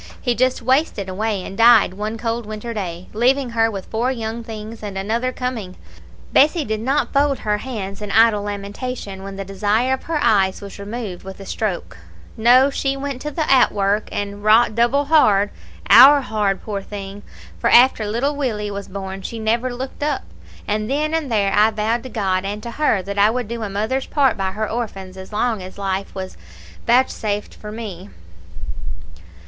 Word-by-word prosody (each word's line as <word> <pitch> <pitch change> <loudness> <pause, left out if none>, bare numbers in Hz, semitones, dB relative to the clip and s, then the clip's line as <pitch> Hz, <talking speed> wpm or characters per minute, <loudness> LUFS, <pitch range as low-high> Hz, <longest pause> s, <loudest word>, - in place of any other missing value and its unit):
He 245 - 0
just 255 0 0
wasted 255 - +1
away, 200 +1 -2
and 195 - -7
died 230 -3 +6
one 210 +3 -4
cold 230 -1 -3
winter 215 +2 -5
day, 180 -4 -5
leaving 250 +3 +2
her 225 -1 +2
with 195 -3 -6
four 235 +4 -1
young 230 -1 -4
things, 220 0 -8
and 205 -2 -6
another 230 +6 -1
coming. 240 -8 -4 0.6
Bessie 305 +3 +4
did 220 0 -2
not 265 +6 0
fold 280 -1 +2
her 210 -1 -1
hands 205 -6 -6
in 210 - -5
idle 225 -1 +5
lamentation 205 +1 -5
when 195 0 -7
the 195 0 -5
desire 210 +6 +1
of 265 - -4
her 325 -1 -1
eyes 195 -6 +2
was 200 0 -10
removed 205 -2 -6
with 190 0 -10
a 195 - -9
stroke. 190 - -3 0.4
No, 250 +5 +5
she 275 0 -1
went 275 -2 -4
to 300 - -3
the 310 +1 -2
outwork, 210 -5 +3
and 205 0 -4
wrought 220 +1 +5
double 240 +6 +2
hard; 210 -10 +4 0.4
owre 275 +4 +9
hard, 210 -5 -1
poor 205 -2 -4
thing, 200 0 -8 0.4
for - - +1
after 245 -2 +6
little 255 +7 0
Willie 215 -7 -2
was 200 0 -6
born 190 0 -6
she 230 - -6
never 230 +3 0
looked 260 +3 -7
up. 295 +1 -1 0.4
And 215 +1 -1
then 305 +3 0
and 315 -6 -1
there 200 -3 +2
I 210 +1 +5
vowed 220 +2 -1
to 260 - -9
God 190 -5 -1
and 205 +2 -4
to 235 - -5
her 230 -8 +1
that 200 +2 -4
I 205 +1 +6
would 245 0 -2
do 235 +1 -5
a 210 - -3
mother's 220 +7 -2
part 275 -5 +2
by 190 -1 -2
her 215 +1 -2
orphans 195 -5 -5
as 190 +1 -10
long 220 0 0
as 185 +1 -10
life 195 -1 -3
was 190 -1 -6 0.5
vouchsafed 225 -4 0
to 210 - -7
me. 205 -4 -7
220 Hz, 185 wpm, -20 LUFS, 200-250 Hz, 0.6 s, owre